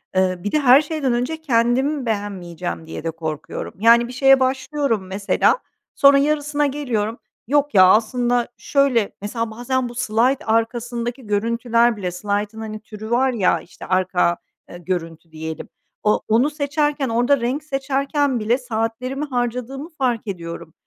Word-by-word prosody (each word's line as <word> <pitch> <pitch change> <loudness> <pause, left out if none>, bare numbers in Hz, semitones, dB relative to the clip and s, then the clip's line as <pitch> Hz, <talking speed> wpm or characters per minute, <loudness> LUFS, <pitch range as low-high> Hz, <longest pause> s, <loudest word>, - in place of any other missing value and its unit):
Eee, 185 -1 +2
bir 205 +3 -4
de, 305 - +2
her 270 +1 +7
şeyden 295 -5 -1
önce 265 +7 -2
kendim 260 +1 +1
beğenmeyeceğim 180 -6 -4
diye 160 - -7
de 165 - -2
korkuyorum. 160 -1 -6
Yani, 235 +2 +5
bir 250 - -9
şeye 270 +1 +5
başlıyorum, 260 -5 -1
mesela, 195 - +1 0.4
sonra 280 0 +6
yarısına 295 0 +1
geliyorum. 245 -6 -2 0.3
"Yok, 290 0 +1
ya, 185 - +8
aslında 240 +4 +2
şöyle" 270 -7 +1
mesela, 225 +2 -3
bazen 245 +2 -2
bu 240 - -11
slayt 250 +2 +1
arkasındaki 235 +1 -1
görüntüler 230 +2 +1
bile, 180 -3 -3
slaytın, 205 +3 -3
hani, 215 -1 -6
türü 215 0 -9
var 260 +2 +3
ya, 195 -6 +2
işte, - - -12
arka, 185 -2 +1 0.3
eee, 175 - -9
görüntü 165 -2 -5
diyelim, 160 0 -6 0.3
o 210 - +2
onu 235 +7 +3
seçerken 295 -2 -1
orada 245 +3 +2
renk 265 +6 -1
seçerken 275 -1 0
bile 230 +4 +1
saatlerimi 250 +3 -3
harcadığımı 250 +3 -3
fark 250 -8 -2
ediyorum. 170 -4 -6
240 Hz, 145 wpm, -21 LUFS, 205-270 Hz, 0.4 s, ya